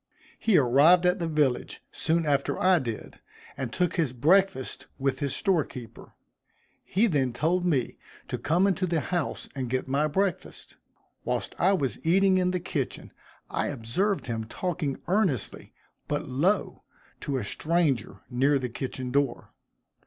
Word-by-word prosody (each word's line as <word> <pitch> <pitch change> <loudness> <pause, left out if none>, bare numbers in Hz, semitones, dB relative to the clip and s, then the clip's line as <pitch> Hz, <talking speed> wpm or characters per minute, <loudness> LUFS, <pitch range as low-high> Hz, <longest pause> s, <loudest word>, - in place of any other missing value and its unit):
He 215 -5 +3
arrived 145 +7 +5
at 180 +2 +3
the 170 - -1
village 150 -6 0
soon 165 +1 +1
after 140 -2 0
I 185 -1 +4
did, 115 -6 -6 0.4
and 130 -4 -4
took 180 +5 0
his 155 -7 +1
breakfast 175 +3 +2
with 135 -1 -1
his 140 -2 -1
store 190 -7 +2
keeper. 120 -4 -11 0.7
He 205 +5 +2
then 140 - +1
told 170 +8 +1
me 135 -8 0 0.3
to - - -4
come 170 +6 +2
into 190 -1 +1
the 165 -2 +1
house 175 -2 -3
and 130 -3 -4
get 130 +1 -1
my 140 +3 +1
breakfast. 190 +4 -2 0.5
Whilst - - -2
I 190 +3 +4
was 135 - -1
eating 190 +3 +4
in 180 0 +2
the 180 0 -1
kitchen, 160 -7 -4 0.4
I - - -2
observed 145 - -1
him 115 -2 -3
talking 155 +2 -3
earnestly, 185 - 0 0.4
but 145 - -2
low, 170 +10 0 0.4
to 140 -2 -2
a 125 - -2
stranger 135 - 0
near 135 +3 +2
the 130 -2 -3
kitchen 130 0 -5
door. 140 -1 -1
150 Hz, 155 wpm, -27 LUFS, 130-180 Hz, 0.7 s, arrived